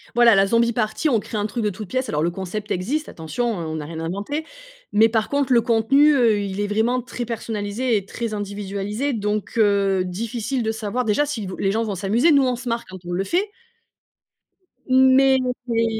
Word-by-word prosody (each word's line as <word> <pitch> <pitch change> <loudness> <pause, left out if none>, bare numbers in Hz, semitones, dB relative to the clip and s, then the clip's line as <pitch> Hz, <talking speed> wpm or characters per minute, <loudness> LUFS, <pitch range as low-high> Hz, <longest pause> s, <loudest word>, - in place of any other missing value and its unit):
Voilà, 240 -1 +6
la 195 0 +4
zombie 230 +2 +3
party, 235 +7 0
on 230 - +3
crée 215 - -6
un 205 - -1
truc 215 +3 -3
de 210 - +1
toutes 205 0 -8
pièces 255 0 -1
alors 150 +1 -1
le 170 - +1
concept 195 +3 -5
existe, 265 - -2
attention, 175 +10 -3
on 160 -4 -4
on 155 - -4
a - - -7
rien 160 +1 -7
inventé 200 - -3 0.5
mais 220 +2 +5
par 220 -1 0
contre 280 -2 0
le 240 - +6
contenu, 245 +6 +4
heu, 230 -5 +3
il 200 0 -3
est 205 - -1
vraiment 230 +4 +1
très 245 0 -6
personnalisé 225 +1 -2
et 195 - -4
très 230 +2 -4
individualisé, 205 +5 -3
donc 210 -1 -2
heu, 200 -3 +2
difficile 230 +6 -3
de 220 - 0
savoir, 225 +3 -2
déjà, 225 +7 +1
si 240 -8 -4
vous 185 - -6
les 195 - 0
gens 225 +1 0
vont 205 -3 -3
s'amuser, 220 - +2
nous 280 -2 +5
on 250 - 0
se 245 0 -6
marre 235 0 -2
quand 185 0 -10
on 175 - -5
le 190 +2 -1
fait 380 - 0 1.4
mais 260 +1 +5 0.3
c'est 230 -1 +1
220 Hz, 215 wpm, -22 LUFS, 200-245 Hz, 1.4 s, Voilà